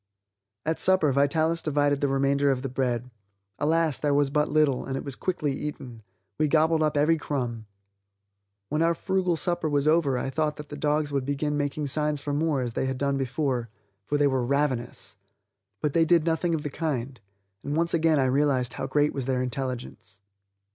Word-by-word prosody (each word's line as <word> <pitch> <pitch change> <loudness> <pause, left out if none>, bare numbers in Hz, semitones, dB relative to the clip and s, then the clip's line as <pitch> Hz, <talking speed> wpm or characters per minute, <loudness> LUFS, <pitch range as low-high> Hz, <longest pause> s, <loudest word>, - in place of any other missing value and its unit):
At 160 +1 -1
supper 185 -6 +4
Vitalis 155 +5 +2
divided 145 -2 +1
the 145 - +2
remainder 140 +1 +2
of 130 -1 0
the 135 - -2
bread. 125 -1 -2 0.5
Alas, 160 -1 +1
there 145 -1 +1
was 145 -1 +2
but 150 +1 +1
little, 150 -4 +2
and 135 0 -3
it - - -5
was 140 -3 -5
quickly 155 -5 -2
eaten; 130 -5 -6 0.4
we 155 - +3
gobbled 160 +1 +3
up 150 -1 +1
every 155 +3 +3
crumb. 120 -7 -3 1.0
When 150 +2 0
our 165 0 +3
frugal 185 -1 0
supper 175 -1 -1
was 145 0 +1
over 155 -5 +3
I 130 +2 -3
thought 150 +1 0
that 150 0 -10
the 145 - -6
dogs 150 0 0
would 140 -2 0
begin 145 +2 -1
making 145 +1 -2
signs 150 +1 +1
for 145 +1 -4
more 150 -2 +1
as 120 -2 -3
they 130 - -1
had 130 -1 -2
done 140 +1 0
before, 130 -2 -1 0.4
for 145 - +1
they 145 - +3
were 130 -3 +1
ravenous. 130 -5 -1 0.6
But 150 -2 0
they 165 - +4
did 165 -1 +3
nothing 165 +1 +1
of 150 - -4
the 150 - -4
kind, 135 -6 -3 0.4
and 145 - -3
once 170 +1 +1
again 165 -2 +3
I 135 - +3
realized 130 -1 +1
how 135 - -4
great 145 +2 +1
was 135 -3 -3
their 130 -1 0
intelligence. 125 -5 -5
145 Hz, 195 wpm, -26 LUFS, 135-155 Hz, 1.0 s, supper